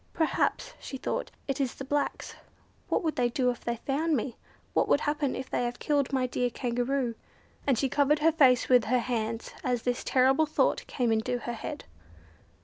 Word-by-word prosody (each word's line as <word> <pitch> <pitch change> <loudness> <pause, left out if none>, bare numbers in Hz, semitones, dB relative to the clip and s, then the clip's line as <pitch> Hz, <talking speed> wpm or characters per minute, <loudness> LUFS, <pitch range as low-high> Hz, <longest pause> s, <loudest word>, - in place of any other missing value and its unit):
"Perhaps," 330 +9 0
she 270 - -6
thought, - - -3 0.2
"It 275 0 -1
is 260 -3 -1
the 270 - -7
blacks. 285 +1 -2 0.6
What - - +1
would 320 -2 0
they 245 -1 +2
do 250 +1 +1
if 240 - -9
they 235 - -1
found 290 +6 0
me? 235 +1 -3 0.4
What - - +2
will - - +5
happen 295 -2 -1
if 260 - -5
they - - -1
have 240 0 -2
killed 285 -3 0
my 260 -2 +1
dear 250 0 0
Kangaroo?" 245 +1 -1 0.5
And 270 -4 +3
she 270 - +1
covered 285 +3 +3
her 315 +2 +4
face 265 -6 +4
with 250 -3 +5
her 250 +3 +2
hands 230 -2 -2
as 245 -2 0
this 245 0 -1
terrible 265 +4 +3
thought 310 - +1
came 245 -3 0
into 225 +3 0
her 240 0 -5
head. 230 - -6
255 Hz, 195 wpm, -29 LUFS, 245-285 Hz, 0.6 s, will